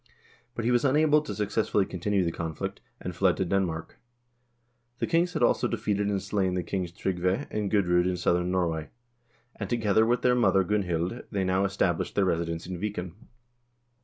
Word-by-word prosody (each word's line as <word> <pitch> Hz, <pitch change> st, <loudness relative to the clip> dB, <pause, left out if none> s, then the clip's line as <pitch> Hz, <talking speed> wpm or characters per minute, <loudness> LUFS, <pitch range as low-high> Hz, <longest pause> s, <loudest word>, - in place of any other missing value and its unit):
But 115 Hz, -, -3 dB
he 120 Hz, -, +3 dB
was 120 Hz, -1 st, +3 dB
unable 150 Hz, +2 st, +4 dB
to -, -, -6 dB
successfully 105 Hz, -1 st, +1 dB
continue 95 Hz, +2 st, 0 dB
the 85 Hz, -, 0 dB
conflict, 80 Hz, -2 st, -5 dB, 0.2 s
and 90 Hz, -1 st, -6 dB
fled 90 Hz, 0 st, +2 dB
to 95 Hz, -, 0 dB
Den 95 Hz, +2 st, +2 dB
mark. 80 Hz, -2 st, -6 dB, 1.0 s
The -, -, -1 dB
kings 175 Hz, +2 st, +1 dB
had 155 Hz, -, 0 dB
also -, -, +3 dB
defeated 105 Hz, -1 st, -1 dB
and 100 Hz, -1 st, 0 dB
slain 95 Hz, -2 st, -1 dB
the 90 Hz, -, -1 dB
kings 90 Hz, -2 st, -3 dB
Tryggve 90 Hz, 0 st, -1 dB
and 105 Hz, -2 st, -2 dB
Gudr0d 90 Hz, -4 st, +3 dB
in 90 Hz, -1 st, -1 dB
southern 90 Hz, 0 st, +1 dB
Norway, 85 Hz, -4 st, -1 dB, 0.7 s
and -, -, -5 dB
together 110 Hz, -3 st, +3 dB
with 120 Hz, +2 st, +1 dB
their 125 Hz, -, +4 dB
mother 115 Hz, -6 st, +3 dB
Gunhild, 90 Hz, +1 st, -1 dB
they 100 Hz, -3 st, -1 dB
now 95 Hz, +1 st, +1 dB
established 95 Hz, -3 st, 0 dB
their 100 Hz, -, +3 dB
residence 85 Hz, -2 st, -1 dB
in 90 Hz, -2 st, -5 dB
Viken. 100 Hz, -4 st, -3 dB
95 Hz, 180 wpm, -27 LUFS, 90-105 Hz, 1.0 s, unable